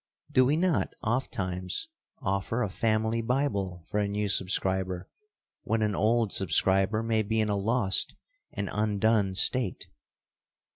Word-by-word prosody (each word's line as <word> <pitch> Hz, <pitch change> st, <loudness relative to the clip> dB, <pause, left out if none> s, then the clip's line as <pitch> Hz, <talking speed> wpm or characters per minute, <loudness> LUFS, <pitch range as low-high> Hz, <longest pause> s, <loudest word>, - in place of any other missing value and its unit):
Do 130 Hz, -, +5 dB
we 145 Hz, +4 st, +2 dB
not 175 Hz, -2 st, 0 dB
ofttimes 100 Hz, -, -2 dB, 0.4 s
offer 100 Hz, +5 st, -1 dB
a 105 Hz, -, -2 dB
family 110 Hz, +2 st, 0 dB
Bible 100 Hz, -, -1 dB
for 105 Hz, -, -1 dB
a 105 Hz, -, +1 dB
new 105 Hz, 0 st, -2 dB
subscriber 95 Hz, -1 st, 0 dB, 0.5 s
when 110 Hz, 0 st, 0 dB
an 105 Hz, -1 st, +1 dB
old 110 Hz, +1 st, +1 dB
subscriber 95 Hz, +4 st, +2 dB
may 115 Hz, -1 st, +1 dB
be 110 Hz, +1 st, -1 dB
in 110 Hz, -1 st, +1 dB
a 100 Hz, -, +1 dB
lost 105 Hz, 0 st, +1 dB, 0.4 s
and 100 Hz, -, -4 dB
undone 105 Hz, -1 st, +1 dB
state? 120 Hz, -1 st, +2 dB
105 Hz, 135 wpm, -28 LUFS, 95-115 Hz, 0.5 s, Do